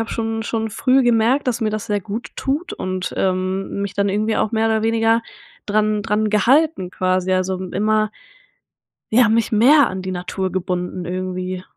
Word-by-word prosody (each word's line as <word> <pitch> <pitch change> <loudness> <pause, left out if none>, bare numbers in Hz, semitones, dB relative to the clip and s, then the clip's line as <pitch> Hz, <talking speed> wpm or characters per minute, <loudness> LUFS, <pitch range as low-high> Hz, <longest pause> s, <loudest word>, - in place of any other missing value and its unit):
habe 225 - -3
schon 225 -1 -2
schon 225 -1 -2
früh 260 +5 +2
gemerkt, 240 +4 +2
dass 240 -1 -1
mir 215 - 0
das 215 +1 -4
sehr 205 -1 0
gut 215 +4 -6
tut 295 +7 -2
und, 185 0 -4
ähm, 190 +1 -1
mich 200 0 -4
dann 200 0 +1
irgendwie 215 +3 0
auch 215 - 0
mehr 225 0 +1
oder 220 -1 +1
weniger 225 0 +2 0.4
dran 215 0 +1
dran 210 +2 0
gehalten 240 - +2
quasi, 185 0 0
also 185 0 0
m 185 -1 -7
immer 215 +1 +1 1.0
ja, 240 0 +6
mich 225 +1 +1
mehr 260 +6 +6
an 190 0 -5
die 185 0 -4
Natur 185 +1 -3
gebunden 180 -1 -3
irgendwie. 185 +1 -4
210 Hz, 180 wpm, -20 LUFS, 185-225 Hz, 1.0 s, ja